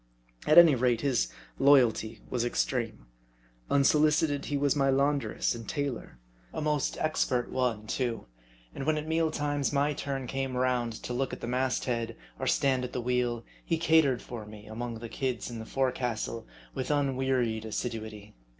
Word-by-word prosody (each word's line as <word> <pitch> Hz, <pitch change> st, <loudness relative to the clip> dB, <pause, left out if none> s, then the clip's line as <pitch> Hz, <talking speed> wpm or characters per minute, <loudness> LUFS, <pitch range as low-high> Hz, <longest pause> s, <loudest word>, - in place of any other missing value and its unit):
At 155 Hz, -, +5 dB
any 170 Hz, -3 st, +10 dB
rate, 125 Hz, -2 st, +2 dB
his 135 Hz, -4 st, +1 dB, 0.3 s
loyalty 120 Hz, -6 st, +4 dB
was 120 Hz, -2 st, -1 dB
extreme. 120 Hz, -, -1 dB, 0.6 s
Unsolicited, 150 Hz, +1 st, +3 dB
he 145 Hz, -, -1 dB
was 140 Hz, 0 st, +2 dB
my 135 Hz, -1 st, +2 dB
laundress 140 Hz, +1 st, +1 dB
and 115 Hz, -2 st, -8 dB
tailor; 140 Hz, -, -3 dB, 0.3 s
a -, -, -5 dB
most 150 Hz, -2 st, 0 dB
expert 130 Hz, -5 st, 0 dB
one, 120 Hz, -5 st, -1 dB
too; 120 Hz, -, -2 dB, 0.5 s
and 135 Hz, -, -5 dB
when 155 Hz, -1 st, +2 dB
at 150 Hz, +1 st, -4 dB
meal 160 Hz, 0 st, +2 dB
times 145 Hz, -2 st, -1 dB
my 145 Hz, +1 st, +2 dB
turn 135 Hz, -2 st, -4 dB
came 135 Hz, 0 st, -3 dB
round 125 Hz, -2 st, +1 dB
to 125 Hz, -, -4 dB
look 130 Hz, +1 st, -1 dB
out -, -, -9 dB
at -, -, -6 dB
the -, -, -4 dB
mast 125 Hz, 0 st, 0 dB
head, 115 Hz, -2 st, -2 dB, 0.2 s
or 130 Hz, -, -2 dB
stand 130 Hz, -2 st, +2 dB
at 125 Hz, -, -5 dB
the -, -, -2 dB
wheel, 120 Hz, -1 st, 0 dB, 0.2 s
he 165 Hz, -, 0 dB
catered 160 Hz, -6 st, +3 dB
for 120 Hz, -3 st, -7 dB
me 105 Hz, 0 st, -11 dB
among 115 Hz, +2 st, -5 dB
the 115 Hz, +1 st, -7 dB
"kids" 125 Hz, -2 st, -3 dB
in 115 Hz, -, -6 dB
the 110 Hz, -, -8 dB
forecastle 125 Hz, -4 st, -2 dB, 0.3 s
with 130 Hz, -2 st, -4 dB
unwearied 130 Hz, -5 st, +1 dB
assiduity. 110 Hz, -2 st, -5 dB
130 Hz, 170 wpm, -29 LUFS, 120-140 Hz, 0.6 s, any